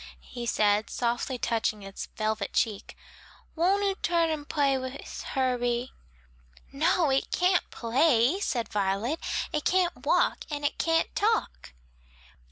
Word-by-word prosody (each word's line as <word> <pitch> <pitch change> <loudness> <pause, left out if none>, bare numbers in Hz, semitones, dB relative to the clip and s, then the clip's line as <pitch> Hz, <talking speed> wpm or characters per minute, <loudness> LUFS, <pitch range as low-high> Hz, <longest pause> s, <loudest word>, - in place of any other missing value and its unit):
he 240 -1 -7
said, 210 -1 +2
softly 240 +2 -1
touching 220 -3 -1
its 195 0 -7
velvet 215 0 -1
cheek. 215 -4 -1 0.6
"Won't 380 +5 +2
'oo 395 -1 +2
tum 335 -1 +2
and 295 -2 -5
pay 280 -3 +2
wis 260 +1 -6
Herbie?" 245 -2 -1 0.8
"No, 310 +2 +2
it 265 - +1
can't 360 0 +2
play," 250 - +2
said 245 - -1
Violet, 205 +9 -1 0.3
"it 300 -1 -1
can't 365 -1 +1
walk - - +3
and 290 -1 -3
it 290 - -1
can't 330 0 +1
talk." 435 - 0
265 Hz, 130 wpm, -28 LUFS, 230-325 Hz, 0.8 s, walk